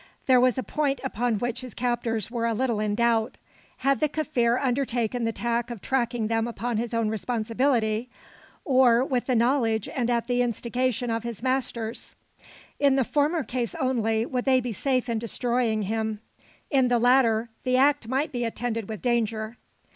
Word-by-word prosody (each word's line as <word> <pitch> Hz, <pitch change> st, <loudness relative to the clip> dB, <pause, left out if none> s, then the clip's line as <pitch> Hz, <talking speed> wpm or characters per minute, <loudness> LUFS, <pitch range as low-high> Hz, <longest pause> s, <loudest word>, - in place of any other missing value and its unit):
There 255 Hz, -2 st, +5 dB
was 255 Hz, -1 st, +3 dB
a 260 Hz, -, -1 dB
point 280 Hz, +5 st, -1 dB
upon 245 Hz, -3 st, -1 dB
which 240 Hz, +3 st, -3 dB
his 255 Hz, -2 st, -9 dB
captors 235 Hz, -3 st, -1 dB
were 230 Hz, -1 st, -1 dB
a 230 Hz, -, 0 dB
little 235 Hz, -2 st, 0 dB
in 210 Hz, -1 st, 0 dB
doubt. 230 Hz, 0 st, +1 dB, 0.4 s
Had 275 Hz, +1 st, +1 dB
the 305 Hz, -, +2 dB
Kaffir 255 Hz, -6 st, +1 dB
undertaken 245 Hz, -3 st, 0 dB
the 225 Hz, -, +1 dB
task 235 Hz, +1 st, -2 dB
of 235 Hz, -3 st, -6 dB
tracking 240 Hz, -1 st, -1 dB
them 225 Hz, +1 st, 0 dB
upon 235 Hz, 0 st, -3 dB
his 235 Hz, +1 st, -2 dB
own 230 Hz, -2 st, 0 dB
responsibility, 230 Hz, +1 st, 0 dB, 0.6 s
or 255 Hz, -2 st, +4 dB
with 255 Hz, -3 st, -1 dB
the 255 Hz, -, +2 dB
knowledge 230 Hz, -3 st, +2 dB
and 245 Hz, -2 st, -2 dB
at 235 Hz, -1 st, +1 dB
the 245 Hz, 0 st, +1 dB
instigation 245 Hz, +1 st, -1 dB
of 225 Hz, 0 st, -1 dB
his 235 Hz, 0 st, -6 dB
masters? 245 Hz, -3 st, -2 dB, 0.6 s
In 280 Hz, -2 st, +4 dB
the 270 Hz, -, +3 dB
former 300 Hz, +5 st, +1 dB
case 240 Hz, -3 st, -3 dB
only, 225 Hz, -3 st, 0 dB
would 250 Hz, 0 st, -3 dB
they 260 Hz, -1 st, +4 dB
be 245 Hz, -2 st, -4 dB
safe 255 Hz, +2 st, 0 dB
in 230 Hz, -2 st, -1 dB
destroying 235 Hz, -1 st, 0 dB
him. 220 Hz, +1 st, -2 dB, 0.5 s
In 265 Hz, -3 st, +4 dB
the 245 Hz, -1 st, +3 dB
latter, 235 Hz, -2 st, +3 dB
the 255 Hz, 0 st, +2 dB
act 280 Hz, -2 st, +3 dB
might 270 Hz, +5 st, -1 dB
be 245 Hz, -3 st, -2 dB
attended 230 Hz, -2 st, -3 dB
with 215 Hz, -2 st, -6 dB
danger. 225 Hz, -2 st, 0 dB
240 Hz, 175 wpm, -26 LUFS, 225-255 Hz, 0.6 s, There